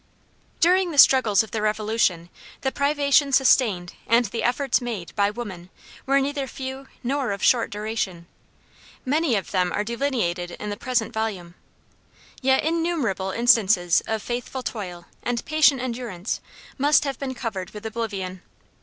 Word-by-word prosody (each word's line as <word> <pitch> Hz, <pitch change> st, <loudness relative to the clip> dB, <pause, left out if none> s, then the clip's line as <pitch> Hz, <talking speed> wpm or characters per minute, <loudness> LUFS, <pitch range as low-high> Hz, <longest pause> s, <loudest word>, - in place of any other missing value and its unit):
During 365 Hz, +2 st, +4 dB
the 305 Hz, -, -6 dB
struggles 235 Hz, -7 st, +6 dB
of 220 Hz, -, -12 dB
the 220 Hz, -, -2 dB
Revolution, 210 Hz, -5 st, 0 dB, 0.3 s
the 265 Hz, -, 0 dB
privations 280 Hz, -1 st, +2 dB
sustained, 215 Hz, -9 st, +3 dB
and 235 Hz, +2 st, +4 dB
the 225 Hz, +3 st, -4 dB
efforts 255 Hz, +2 st, +1 dB
made, 210 Hz, -10 st, -5 dB
by 200 Hz, 0 st, +3 dB
women, 205 Hz, -6 st, -7 dB, 0.4 s
were 275 Hz, +1 st, +4 dB
neither 280 Hz, 0 st, -2 dB
few 265 Hz, +1 st, -7 dB, 0.2 s
nor 270 Hz, +1 st, -1 dB
of 200 Hz, -1 st, -4 dB
short 240 Hz, -2 st, +3 dB
duration. 210 Hz, -5 st, -4 dB, 0.8 s
Many 290 Hz, -1 st, +1 dB
of 195 Hz, -, -3 dB
them 180 Hz, -2 st, +1 dB
are 205 Hz, -, -1 dB
delineated 215 Hz, -8 st, -2 dB
in 210 Hz, 0 st, -4 dB
the -, -, -3 dB
present 240 Hz, 0 st, -1 dB
volume. 200 Hz, -6 st, -3 dB, 0.9 s
Yet 265 Hz, 0 st, +3 dB
innumerable 315 Hz, -, -1 dB
instances 200 Hz, -6 st, +4 dB
of 220 Hz, -1 st, -2 dB
faithful 245 Hz, +2 st, -4 dB
toil, 180 Hz, -8 st, -6 dB, 0.2 s
and 240 Hz, -1 st, -2 dB
patient 305 Hz, -3 st, +4 dB
endurance, 235 Hz, -6 st, -4 dB, 0.4 s
must 290 Hz, +2 st, +4 dB
have 275 Hz, -3 st, -4 dB
been 265 Hz, -2 st, -4 dB
covered 200 Hz, -7 st, -4 dB
with 210 Hz, +1 st, -10 dB
oblivion. 200 Hz, -5 st, -4 dB
230 Hz, 145 wpm, -24 LUFS, 200-270 Hz, 0.9 s, struggles